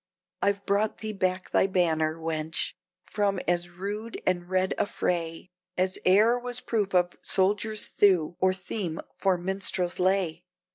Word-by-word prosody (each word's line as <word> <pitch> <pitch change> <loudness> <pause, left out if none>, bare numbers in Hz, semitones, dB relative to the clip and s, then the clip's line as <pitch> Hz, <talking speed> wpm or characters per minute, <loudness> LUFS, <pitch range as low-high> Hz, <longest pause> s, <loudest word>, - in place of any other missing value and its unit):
"I've 200 0 +1
brought 205 +2 +1
thee 215 -1 -4
back 185 -1 -1
thy - - +4
banner, 160 -4 +1
wench, 160 -1 -2 0.3
from 200 -2 0
as 175 0 +1
rude 205 +6 -5
and 175 -1 0
red 185 0 +1
a - - +2
fray, 170 -1 -2 0.3
As 185 +1 0
e'er 220 +6 +5
was 245 0 -3
proof 205 -6 -1
of 175 -1 +3
soldier's 210 +3 +1
thew 175 -5 +3
or 185 0 +4
theme 185 -2 -4
for 190 -2 +1
minstrel's 185 0 -2
lay! 180 -3 +1
185 Hz, 145 wpm, -27 LUFS, 175-200 Hz, 0.3 s, e'er